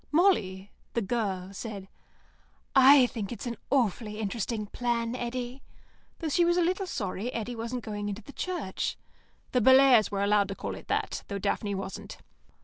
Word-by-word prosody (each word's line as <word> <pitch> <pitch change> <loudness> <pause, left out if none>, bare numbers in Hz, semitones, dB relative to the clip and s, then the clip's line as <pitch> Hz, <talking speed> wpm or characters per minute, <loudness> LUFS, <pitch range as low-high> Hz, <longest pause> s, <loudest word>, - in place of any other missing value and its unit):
Molly 205 - +2 0.2
(the 235 - +2
girl) 195 -4 -2
said, 200 -2 -6 0.9
"I 270 0 +8
think 220 -5 -4
it's 240 - -6
an 235 -1 -3
awfully 225 -4 +1
interesting 215 +1 -2
plan, 235 +1 -1
Eddy," 245 +1 -4 0.6
though 325 - -3
she 345 +4 +3
was 345 +1 +3
a 355 - +4
little 370 +3 0
sorry 205 - -3
Eddy 235 0 -4
wasn't 235 +1 -4
going 205 -1 -4
into 205 +2 -5
the 280 - -12
Church. 345 - -3 0.5
(The 250 - +2
Bellairs 260 -2 +7
were 200 0 -1
allowed 205 0 +3
to 195 - -5
call - - -4
it - - -10
that, - - -1
though 200 - -3
Daphne 200 +1 -1
wasn't.) 195 0 -6
230 Hz, 165 wpm, -28 LUFS, 200-260 Hz, 0.9 s, I